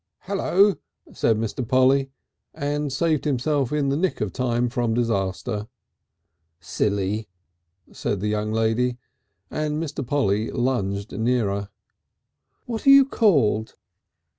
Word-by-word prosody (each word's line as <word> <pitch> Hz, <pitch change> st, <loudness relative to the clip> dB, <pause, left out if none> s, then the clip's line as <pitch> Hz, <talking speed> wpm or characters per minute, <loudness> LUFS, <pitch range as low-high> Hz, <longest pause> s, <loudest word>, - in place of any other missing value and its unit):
"Hello," 200 Hz, +1 st, +2 dB, 0.4 s
said 110 Hz, -, +1 dB
Mr. 115 Hz, +3 st, -3 dB
Polly, 135 Hz, +1 st, +3 dB, 0.5 s
and 145 Hz, 0 st, -2 dB
saved 155 Hz, +2 st, +1 dB
himself 140 Hz, -1 st, 0 dB
in 145 Hz, -2 st, 0 dB
the 135 Hz, -, +1 dB
nick 180 Hz, +4 st, -1 dB
of 105 Hz, -3 st, -2 dB
time 125 Hz, -1 st, 0 dB
from 120 Hz, -1 st, -1 dB
disaster. 105 Hz, -1 st, -1 dB, 0.9 s
"Silly," 100 Hz, +3 st, -1 dB, 0.6 s
said 100 Hz, -, -3 dB
the 105 Hz, -, -2 dB
young 105 Hz, 0 st, -1 dB
lady, 115 Hz, +3 st, +1 dB, 0.5 s
and 150 Hz, -1 st, -2 dB
Mr. 155 Hz, -3 st, -3 dB
Polly 115 Hz, -5 st, 0 dB
lunged 105 Hz, -6 st, -1 dB
nearer. 105 Hz, -4 st, 0 dB, 1.0 s
"What 235 Hz, +2 st, -5 dB
are -, -, +9 dB
you 275 Hz, 0 st, +9 dB
called?" 140 Hz, -, +2 dB
125 Hz, 115 wpm, -23 LUFS, 105-145 Hz, 1.0 s, are